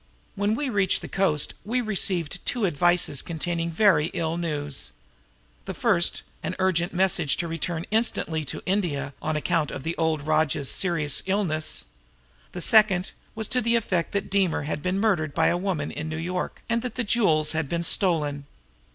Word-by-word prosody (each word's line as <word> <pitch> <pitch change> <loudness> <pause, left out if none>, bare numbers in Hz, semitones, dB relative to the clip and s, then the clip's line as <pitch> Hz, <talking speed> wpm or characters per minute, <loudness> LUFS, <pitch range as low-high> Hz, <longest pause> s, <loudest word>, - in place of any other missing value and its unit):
When 205 +2 0
we 285 +4 -2
reached 200 -6 +1
the - - -5
coast 160 -7 +1
we 235 +6 0
received 185 -7 0
two 240 -4 0
advices 175 -4 +2
containing 170 0 -2
very 170 -3 +4
ill 165 -2 -1
news. 150 -5 -2 0.7
The - - -5
first - - +2 0.2
was - - -3
an - - -4
urgent 185 -2 +1
message 180 -5 +2
to 170 - -2
return 165 0 -3
instantly 210 -8 0
to - - -5
India 155 -8 -1
on 155 0 -1
account 155 0 0
of 135 - -6
the 165 +2 -2
old 160 -2 0
rajah's 155 -3 +1
serious 165 -6 0
illness; 180 -6 -1 0.7
the 180 - -4
second 205 -5 +4 0.2
was 220 -1 -2
to 250 - +1
the 235 0 +2
effect 185 -7 0
that 200 -1 -2
Deemer 195 -6 +2
had 150 0 -3
been 185 +3 -1
murdered 175 -9 +1
by - - +4
a - - +2
woman 175 -6 -2
in 155 +1 -5
New 155 - -4
York, 180 +3 -4
and 230 0 +1
that 250 -2 -5
the 250 - 0
jewels 165 -9 +2
had 160 -3 -2
been 170 0 -1
stolen." 150 -6 +1
175 Hz, 175 wpm, -25 LUFS, 155-195 Hz, 0.7 s, very